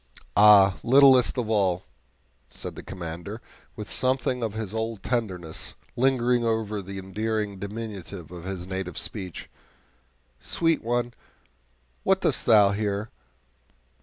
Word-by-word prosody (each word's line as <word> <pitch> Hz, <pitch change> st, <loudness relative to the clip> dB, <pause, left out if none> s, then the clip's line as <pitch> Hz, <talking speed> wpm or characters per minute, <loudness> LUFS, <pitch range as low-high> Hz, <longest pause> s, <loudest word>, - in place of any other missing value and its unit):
"Ah, 100 Hz, -2 st, +7 dB
littlest 130 Hz, 0 st, +6 dB
of 120 Hz, -3 st, -1 dB
all," 95 Hz, -4 st, +1 dB, 0.7 s
said -, -, -8 dB
the -, -, -8 dB
Commander, 90 Hz, +4 st, -7 dB, 0.4 s
with 105 Hz, 0 st, -7 dB
something 130 Hz, 0 st, +1 dB
of 110 Hz, -2 st, -3 dB
his 110 Hz, -3 st, -4 dB
old 110 Hz, -1 st, -3 dB
tenderness, 95 Hz, -10 st, -3 dB, 0.2 s
lingering 125 Hz, -1 st, +2 dB
over 110 Hz, -2 st, -1 dB
the 95 Hz, +1 st, -8 dB
endearing 105 Hz, +1 st, -3 dB
diminutives 100 Hz, -4 st, -7 dB
of 90 Hz, -2 st, -9 dB
his 95 Hz, -1 st, -5 dB
native 95 Hz, -2 st, -5 dB
speech 95 Hz, -5 st, -5 dB, 0.9 s
"sweet 165 Hz, -1 st, 0 dB
one, 120 Hz, +1 st, -1 dB, 0.9 s
what 190 Hz, 0 st, +2 dB
doest 140 Hz, -, 0 dB
thou 105 Hz, -4 st, +6 dB
here? 100 Hz, +1 st, -2 dB
105 Hz, 120 wpm, -26 LUFS, 95-120 Hz, 0.9 s, Ah